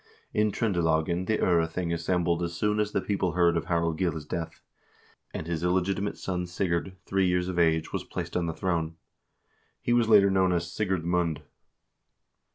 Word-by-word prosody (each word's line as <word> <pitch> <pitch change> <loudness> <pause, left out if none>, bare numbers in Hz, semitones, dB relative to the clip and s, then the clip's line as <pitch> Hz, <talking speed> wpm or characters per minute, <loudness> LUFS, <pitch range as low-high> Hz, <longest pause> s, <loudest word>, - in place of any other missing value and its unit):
In 105 0 +2
Tr0ndelagen 85 -4 0
the 110 - +2
0rething 85 0 +1
assembled 85 0 0
as 85 -1 -3
soon 105 +4 0
as 105 0 0
the - - 0
people 95 -4 -1
heard 85 -1 +3
of 85 - -1
Harald 85 -2 0
Gille's 80 -5 -1
death, 80 +1 -5 0.7
and - - -5
his 85 -1 -3
illegitimate 95 +3 0
son 90 -1 -3
Sigurd, 85 +1 -2
three 95 -1 +1
years 90 0 +1
of 90 -1 -2
age, 80 -1 +2
was - - -2
placed - - -6
on 85 -1 0
the 80 - -2
throne. 85 -3 -1 0.8
He 120 - 0
was 120 -2 +3
later 100 -3 +6
known 95 -1 +3
as 85 -1 -2
Sigurd 95 -6 -1
Mund. 85 -3 0
90 Hz, 170 wpm, -27 LUFS, 85-95 Hz, 0.8 s, later